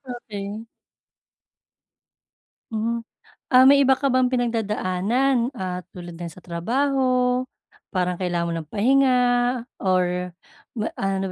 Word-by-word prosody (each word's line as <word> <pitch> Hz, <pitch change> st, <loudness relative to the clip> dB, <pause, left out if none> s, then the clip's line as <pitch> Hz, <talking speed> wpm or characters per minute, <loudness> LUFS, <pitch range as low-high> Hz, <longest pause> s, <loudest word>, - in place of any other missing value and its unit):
okey. 210 Hz, -1 st, -7 dB, 2.1 s
Hmm, 230 Hz, +2 st, -1 dB, 0.5 s
ah, 255 Hz, 0 st, +7 dB
may 280 Hz, +1 st, +7 dB
iba 265 Hz, -1 st, +4 dB
ka 275 Hz, -2 st, 0 dB
bang 255 Hz, -1 st, +3 dB
pinagdadaanan, 235 Hz, +1 st, 0 dB
ah, 180 Hz, -1 st, -3 dB
tulad 175 Hz, -1 st, -9 dB
ng 170 Hz, 0 st, -6 dB
sa 160 Hz, -, -16 dB
trabaho, 250 Hz, +7 st, 0 dB, 0.5 s
parang 180 Hz, -1 st, 0 dB
kailangan 175 Hz, -1 st, -1 dB
mo 170 Hz, -, -2 dB
ng 155 Hz, -, -16 dB
pahinga 255 Hz, +4 st, +3 dB, 0.6 s
or 180 Hz, -1 st, +1 dB, 0.5 s
ba 215 Hz, -, -1 dB
ano 195 Hz, 0 st, -1 dB
215 Hz, 110 wpm, -23 LUFS, 180-255 Hz, 2.1 s, ah